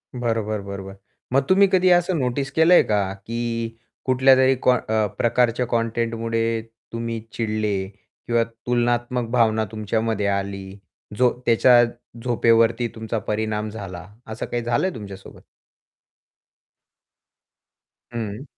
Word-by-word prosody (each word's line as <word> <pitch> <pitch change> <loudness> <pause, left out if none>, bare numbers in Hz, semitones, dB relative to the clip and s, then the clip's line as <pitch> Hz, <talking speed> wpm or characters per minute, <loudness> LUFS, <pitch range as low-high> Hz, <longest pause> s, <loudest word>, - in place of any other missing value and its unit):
बरोबर, 110 -3 -1
बरोबर. 100 0 -8 0.4
मग 135 +1 +4
तुम्ही 195 +1 +6
कधी 185 0 +4
असं 175 0 +3
नोटीस 135 +2 -1
केलंय 165 +4 +6
का? 100 -2 0
की 115 +2 -4 0.3
कुठल्यातरी 130 0 +5
कॉ 125 - +4
अ, 110 -1 0
प्रकारच्या 120 +1 +2
कंटेंटमुळे 115 0 -1 0.3
तुम्ही 115 0 -3
चिडले 110 -3 -1 0.5
किंवा 120 -1 +2
तुलनात्मक 120 +1 -1
भावना 110 -3 +2
तुमच्यामध्ये 110 -1 -1
आली? 100 0 -3 0.4
जो 125 -1 +5 0.2
त्याच्या 120 +1 +6 0.4
झोपेवरती 115 -1 +3
तुमचा 110 0 -4
परिणाम 110 0 -2
झाला, 95 -5 -8 0.3
असं 110 - -4
काही 120 -1 -3
झालंय 120 +11 +1
तुमच्यासोबत? 100 -3 -10 2.7
हं. 110 +1 -4
115 Hz, 105 wpm, -22 LUFS, 110-120 Hz, 2.7 s, तुम्ही